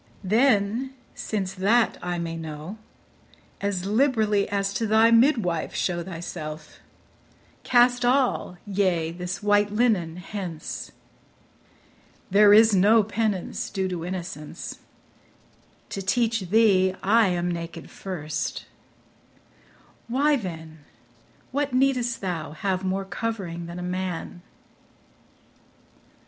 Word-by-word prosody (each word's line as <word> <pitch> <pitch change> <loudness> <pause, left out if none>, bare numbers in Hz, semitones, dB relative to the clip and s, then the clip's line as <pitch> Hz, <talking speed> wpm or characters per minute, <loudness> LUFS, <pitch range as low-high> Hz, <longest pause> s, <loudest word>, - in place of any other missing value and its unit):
Then, 225 +3 +2 0.2
since 195 -3 -3
that 220 +5 +2
I 175 0 -3
may 165 -1 -3
know, 160 +5 -7 0.8
As 200 -2 -2
liberally 215 -2 +2
as 200 -1 -1
to 225 - -1
thy 220 +2 +5
midwife 230 - +2
show 175 -2 -1
Thyself; 165 -3 -7 0.8
cast 245 0 +4
all, 250 -7 +1
yea, 185 -5 0
this 180 +3 -5
white 205 0 +3
linen 210 -8 +1
hence; 180 -4 -6 1.4
There 205 +1 +7
is 220 +1 +7
no 210 +4 +5
penance 210 -2 -2
due 190 -1 -2
to 175 -2 -4
innocence: 175 -4 -6 1.1
To 195 - -4
teach 225 -1 0
thee, 190 -3 +4
I 220 +2 +4
am 175 -1 0
naked 170 -1 -6
first; 155 -6 -4 1.4
why 285 +5 +2
then, 160 - -6 0.7
What 285 0 -1
needst 255 -2 +1
thou 165 -5 -4
have 185 +3 -2
more 190 +1 -1
covering 185 -4 -4
than 170 +1 -7
a 180 - -5
man? 180 -1 -4
195 Hz, 105 wpm, -25 LUFS, 175-225 Hz, 1.4 s, There